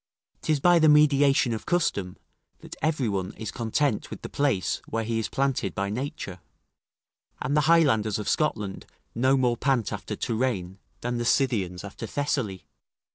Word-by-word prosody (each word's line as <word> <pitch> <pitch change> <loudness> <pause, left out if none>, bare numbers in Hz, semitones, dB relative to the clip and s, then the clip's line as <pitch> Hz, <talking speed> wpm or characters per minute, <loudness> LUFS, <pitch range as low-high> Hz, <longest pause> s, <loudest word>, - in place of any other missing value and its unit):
'Tis 155 -2 +1
by 175 +3 +5
the 155 -1 +5
mediation 140 -4 +4
of 110 - -6
custom, 100 - 0 0.4
that - - -9
every 150 -6 +1
one 95 -1 -2
is 110 -2 -6
content 120 +1 -1
with - - -9
the - - -5
place 140 -10 0
where 115 0 -2
he 115 0 -1
is 110 - -2
planted 135 -7 -1
by 100 +1 -1
nature; 125 - -5 1.0
and 140 +3 -1
the 150 +1 +2
Highlanders 120 -11 +4
of 105 - -5
Scotland 105 -10 -1 0.3
no 130 +3 +3
more 125 -2 +2
pant 130 -5 0
after - - -5
Touraine; 110 -6 -2 0.2
than 120 0 -2
the - - -1
Scythians 105 -10 +1
after 100 +3 -7
Thessaly. 125 -7 -2
120 Hz, 160 wpm, -26 LUFS, 105-145 Hz, 1.0 s, by